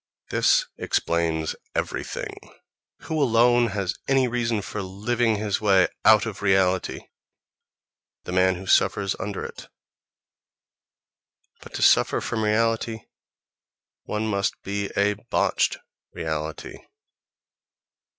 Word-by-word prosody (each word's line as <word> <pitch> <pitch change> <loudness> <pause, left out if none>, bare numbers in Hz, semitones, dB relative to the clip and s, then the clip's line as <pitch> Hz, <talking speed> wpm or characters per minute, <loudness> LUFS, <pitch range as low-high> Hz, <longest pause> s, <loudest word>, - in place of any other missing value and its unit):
This - - +3
explains 80 -2 0 0.2
everything. - - -3 0.7
Who 160 -1 -2
alone 120 -1 +4
has 100 -2 -2
any 135 -2 +3
reason 115 -3 -1
for 105 0 -5
living 110 +5 0
his 105 -1 -2
way 95 -3 +4
out 110 -1 +6
of 110 -4 -6
reality? 95 -2 +1 1.2
The - - -7
man 95 0 +3
who 95 +2 -8
suffers 95 +1 +2
under 100 0 -4
it. - - -9 1.9
But - - -12
to - - -1
suffer - - +4
from 110 - -3
reality 115 +1 0 1.0
one 105 +1 -2
must 100 -2 -1
be 100 0 -3
a 100 +1 +3 0.2
botched - - +1 0.4
reality.... 80 -1 -5
105 Hz, 105 wpm, -24 LUFS, 95-115 Hz, 1.9 s, out